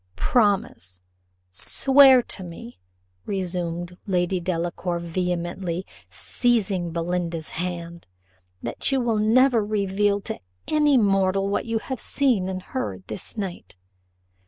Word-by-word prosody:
"Promise, 190 Hz, -, 0 dB, 0.5 s
swear 265 Hz, -, +5 dB
to 190 Hz, -, -4 dB
me," 165 Hz, -, -10 dB, 0.5 s
resumed 180 Hz, -2 st, -3 dB
Lady 180 Hz, -1 st, +1 dB
Delacour 175 Hz, 0 st, -2 dB
vehemently, 175 Hz, +1 st, -3 dB, 0.2 s
seizing 200 Hz, -8 st, 0 dB
Belinda's 170 Hz, -1 st, -2 dB
hand, 170 Hz, -1 st, -5 dB, 0.6 s
"that -, -, -1 dB
you 270 Hz, -, +2 dB
will 230 Hz, -3 st, +1 dB
never 235 Hz, +2 st, +4 dB
reveal 205 Hz, -1 st, +1 dB
to -, -, -5 dB, 0.3 s
any 295 Hz, -3 st, +4 dB
mortal 195 Hz, -2 st, +2 dB
what 200 Hz, -, -1 dB
you 225 Hz, 0 st, 0 dB
have 260 Hz, +2 st, -5 dB
seen 235 Hz, -11 st, +1 dB
and 185 Hz, -1 st, -4 dB
heard 95 Hz, -, -4 dB
this 110 Hz, -, -6 dB
night. 190 Hz, -, -5 dB
185 Hz, 110 wpm, -24 LUFS, 175-215 Hz, 0.6 s, swear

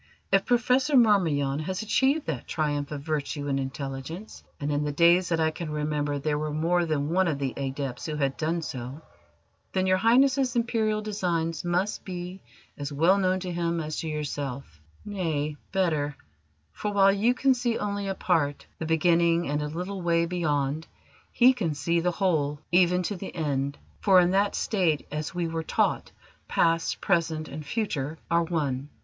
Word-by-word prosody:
If 195 Hz, 0 st, +4 dB
Professor 250 Hz, +4 st, +3 dB
Marmion 160 Hz, -, +3 dB
has 185 Hz, +6 st, -3 dB
achieved 270 Hz, +7 st, +2 dB
that 140 Hz, -7 st, -4 dB
triumph 145 Hz, -2 st, -1 dB
of 145 Hz, -2 st, -5 dB
virtue 145 Hz, -1 st, -2 dB
and 135 Hz, -1 st, 0 dB
intelligence 135 Hz, +8 st, -6 dB, 0.2 s
and 145 Hz, +1 st, -2 dB
in 145 Hz, 0 st, 0 dB
the 150 Hz, -, -1 dB
days 170 Hz, +4 st, +4 dB
that 165 Hz, -1 st, +1 dB
I 160 Hz, 0 st, +2 dB
can 160 Hz, 0 st, -6 dB
remember 150 Hz, -1 st, -1 dB
there 150 Hz, +1 st, -1 dB
were 155 Hz, 0 st, -2 dB
more 165 Hz, +3 st, +1 dB
than 150 Hz, -2 st, -1 dB
one 185 Hz, +1 st, +3 dB
of 155 Hz, -4 st, 0 dB
the 135 Hz, -2 st, -2 dB
adepts 135 Hz, -1 st, -4 dB
who 155 Hz, -, -3 dB
had 140 Hz, -2 st, 0 dB
done 165 Hz, +2 st, -1 dB
so 130 Hz, +1 st, -6 dB, 0.7 s
then 185 Hz, -1 st, +1 dB
Your 185 Hz, 0 st, +3 dB
Highness's 255 Hz, +4 st, +3 dB
Imperial 220 Hz, -2 st, 0 dB
designs 170 Hz, -6 st, -1 dB
must 175 Hz, +4 st, -1 dB
be 180 Hz, 0 st, -6 dB, 0.4 s
as 145 Hz, 0 st, -4 dB
well 165 Hz, +7 st, +3 dB
known 185 Hz, -1 st, +1 dB
to 180 Hz, -1 st, -4 dB
him 170 Hz, -1 st, -1 dB
as 155 Hz, -1 st, -4 dB
to 165 Hz, -, -4 dB
yourself: 140 Hz, -, -5 dB, 0.2 s
nay, 160 Hz, -7 st, -2 dB, 0.2 s
better, 155 Hz, -7 st, 0 dB, 0.5 s
for, 210 Hz, -, -3 dB
while 195 Hz, -1 st, +5 dB
you 225 Hz, +5 st, +2 dB
can 270 Hz, +1 st, +3 dB
see 240 Hz, -2 st, -1 dB
only 200 Hz, -1 st, -2 dB
a 195 Hz, -, -2 dB
part, 145 Hz, -7 st, 0 dB
the 160 Hz, -, -3 dB
beginning 170 Hz, +1 st, +3 dB
and 145 Hz, +1 st, -1 dB
a 150 Hz, -, -2 dB
little 180 Hz, +5 st, -5 dB
way 170 Hz, -1 st, +2 dB
beyond, 155 Hz, -3 st, -1 dB, 0.4 s
he 255 Hz, +2 st, +6 dB
can 175 Hz, -, -2 dB
see 170 Hz, +4 st, +1 dB
the 175 Hz, +2 st, +1 dB
whole, 155 Hz, -6 st, 0 dB
even 180 Hz, 0 st, +4 dB
to 205 Hz, -, -2 dB
the 190 Hz, +1 st, -8 dB
end; 140 Hz, -3 st, -1 dB, 0.2 s
for 190 Hz, -3 st, +6 dB
in 175 Hz, 0 st, +3 dB
that 200 Hz, +1 st, +2 dB
state, 175 Hz, -8 st, 0 dB
as 150 Hz, +2 st, -4 dB
we 175 Hz, -1 st, 0 dB
were 165 Hz, 0 st, -2 dB
taught, 160 Hz, -, 0 dB, 0.4 s
past, 165 Hz, 0 st, +1 dB
present, 165 Hz, -4 st, 0 dB
and 155 Hz, -, -7 dB
future 155 Hz, -, -2 dB
are 170 Hz, 0 st, +4 dB
one. 145 Hz, -5 st, -2 dB
165 Hz, 180 wpm, -27 LUFS, 145-190 Hz, 0.7 s, he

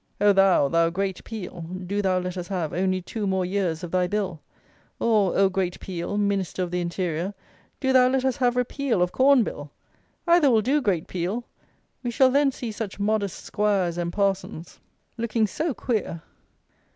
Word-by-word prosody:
Oh, 205 Hz, 0 st, +5 dB
thou, 195 Hz, -7 st, +4 dB
thou 165 Hz, +3 st, +2 dB
great 190 Hz, +2 st, -3 dB
Peel, 190 Hz, -5 st, -7 dB, 0.2 s
do 200 Hz, +3 st, -1 dB
thou 190 Hz, -2 st, +1 dB
let 180 Hz, 0 st, -3 dB
us 180 Hz, -1 st, -5 dB
have 175 Hz, -5 st, -3 dB
only 185 Hz, 0 st, 0 dB
two 210 Hz, +2 st, -4 dB
more 190 Hz, -1 st, 0 dB
years 180 Hz, -4 st, -1 dB
of 175 Hz, -, -6 dB
thy 180 Hz, -1 st, +2 dB
Bill! 190 Hz, -5 st, -2 dB, 0.6 s
Or, 210 Hz, -5 st, +2 dB
oh, 195 Hz, -, +5 dB
great 185 Hz, -1 st, -2 dB
Peel, 185 Hz, +2 st, -4 dB
Minister 200 Hz, -3 st, 0 dB
of 175 Hz, -, -4 dB
the 180 Hz, 0 st, -1 dB
interior, 175 Hz, +2 st, -2 dB, 0.4 s
do 265 Hz, -1 st, +1 dB
thou 255 Hz, -1 st, +6 dB
let 260 Hz, 0 st, +1 dB
us 260 Hz, -2 st, +1 dB
have 245 Hz, -2 st, +2 dB
repeal 250 Hz, -4 st, 0 dB
of 180 Hz, -, -1 dB
Corn 265 Hz, +1 st, +5 dB
Bill! 145 Hz, -7 st, -6 dB, 0.6 s
Either 340 Hz, -4 st, +5 dB
will 225 Hz, -3 st, +3 dB
do, 285 Hz, +5 st, +2 dB
great 185 Hz, -, 0 dB
Peel. 185 Hz, +7 st, -3 dB, 0.6 s
We 245 Hz, -, -3 dB
shall 260 Hz, +2 st, +4 dB
then 280 Hz, 0 st, +3 dB
see 240 Hz, -3 st, -5 dB
such 210 Hz, -2 st, -6 dB
modest 205 Hz, -2 st, -1 dB
'squires, 195 Hz, -5 st, 0 dB
and 170 Hz, 0 st, -2 dB
parsons 195 Hz, -4 st, -2 dB, 0.4 s
looking 225 Hz, -1 st, +1 dB
so 315 Hz, -, -2 dB
queer! 200 Hz, -9 st, -2 dB
195 Hz, 180 wpm, -25 LUFS, 180-230 Hz, 0.6 s, thou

